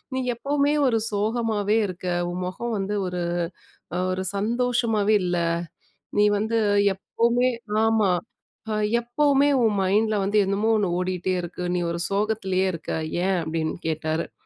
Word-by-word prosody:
"நீ 260 - 0
எப்பவுமே 285 +3 +1
ஒரு 225 -2 +2
சோகமாவே 215 0 0
இருக்க! 185 0 -7 0.2
உன் 180 +1 -4
முகம் 225 +5 -3
வந்து 200 +2 -2
ஒரு, 180 -1 -3 0.7
அ - - 0 0.2
ஒரு 190 0 -2
சந்தோஷமாவே 225 -1 +1
இல்ல. 175 0 0 0.8
நீ 210 - +6
வந்து 220 +2 0 0.4
எப்பவுமே 235 +5 +1 0.4
ஆமா, 220 -4 +3 0.6
அ - - 0 0.3
எப்பவுமே 280 +3 +2 0.2
உன் 220 -2 +3
மைண்ட்ல 210 +3 +2
வந்து 205 +2 +1
என்னமோ 205 +3 +1
ஒன்னு 200 -4 +1
ஓடிட்டே 185 0 -1
இருக்கு. 180 +1 -6
நீ - - +1
ஒரு 170 0 -3
சோகத்திலேயே 195 -2 0
இருக்க, 165 - -7 0.4
ஏன்?" 190 -2 +2
அப்பிடின்னு 160 0 -2
கேட்டாரு. 160 +1 -2
210 Hz, 135 wpm, -24 LUFS, 185-230 Hz, 0.8 s, நீ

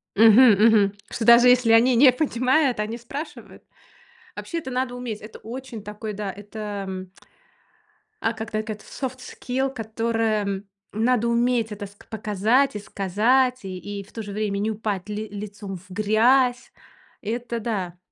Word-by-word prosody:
Мгм, 225 +4 +8
мгм. 205 -1 +4 0.2
Что, 230 - -3
даже 235 +1 +8
если 250 -2 +4
они 240 +3 +5
не 260 +2 +7
понимают, 255 -1 +1
они 215 +2 -2
спрашивают. 275 +6 -9 0.7
Вообще, 335 - -4
это 265 -5 -6
надо 255 0 -2
уметь. 245 -4 -5
Это 215 +1 -11
очень 240 -1 -8
такой, 210 +1 -6
да, 200 -1 -4
это 200 -2 -6 1.1
а 225 - 0
когда 220 -1 -4
эт 215 -1 -5
софт 260 -1 -6
скилл, 260 +1 -3
которое 220 -3 -1 0.3
надо 235 +2 +1
уметь, 235 -1 +1
это 205 0 -6
ск 200 +1 -19
показать 220 +4 +1
и - - -3
сказать, 230 +6 +1
и 185 -1 -5 0.2
и - - -11
в 195 - -20
то 225 - -5
же 205 - -8
время 200 -1 -2
не 215 +2 0
упать 210 -3 -4
ли 210 +1 -4
лицом 205 -1 -7
в 180 +2 -19
грязь. 235 +6 +2 0.5
Это 235 +2 -3
да. 195 -6 -3
220 Hz, 150 wpm, -24 LUFS, 205-245 Hz, 1.1 s, Мгм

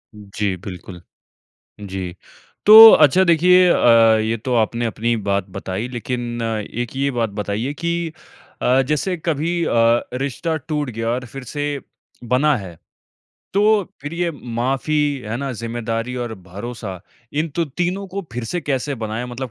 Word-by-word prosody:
जी, 100 -1 -3
बिल्कुल। 90 -1 -9 0.8
जी, 95 -3 -5 0.5
तो 220 +1 +12
अच्छा 155 +5 +5
देखिए 180 +2 +5
अ, 115 -6 +5
ये 115 +1 -1
तो 125 +4 -3
आपने 115 +1 0
अपनी 115 +1 -1
बात 100 -1 +1
बताई 95 +5 -4
लेक़िन 120 -1 -4 0.4
एक 120 +1 -6
ये 140 +1 0
बात 115 -3 -1
बताइए 105 +8 -3
कि 170 0 -2 0.5
अ, 130 +2 +3
जैसे 150 +5 0
कभी 165 +2 -1
अ, - - -1 0.4
रिश्ता 140 +5 -2
टूट 150 -3 -3
गया 115 0 -3
और 125 +1 -2
फ़िर 135 +3 -9
से 145 +3 -3 0.4
बना 130 +5 +2
है 90 -6 -9 0.8
तो 200 - +3 0.4
फ़िर 145 +3 -6
ये 175 0 -1
माफ़ी 130 +2 -2 0.3
है 110 +2 -3
ना 140 +1 -3
ज़िम्मेदारी 115 +1 -4
और 110 - -6
भरोसा 95 +1 -8 0.3
इन 155 +3 -1
तो 170 - +2
तीनों 180 +6 -3
को 195 +2 -5
फ़िर 120 0 -4
से 175 +9 -3
कैसे 140 0 -2
बनाएँ 110 0 -4
मतलब 125 +1 -6
125 Hz, 150 wpm, -20 LUFS, 115-150 Hz, 0.8 s, तो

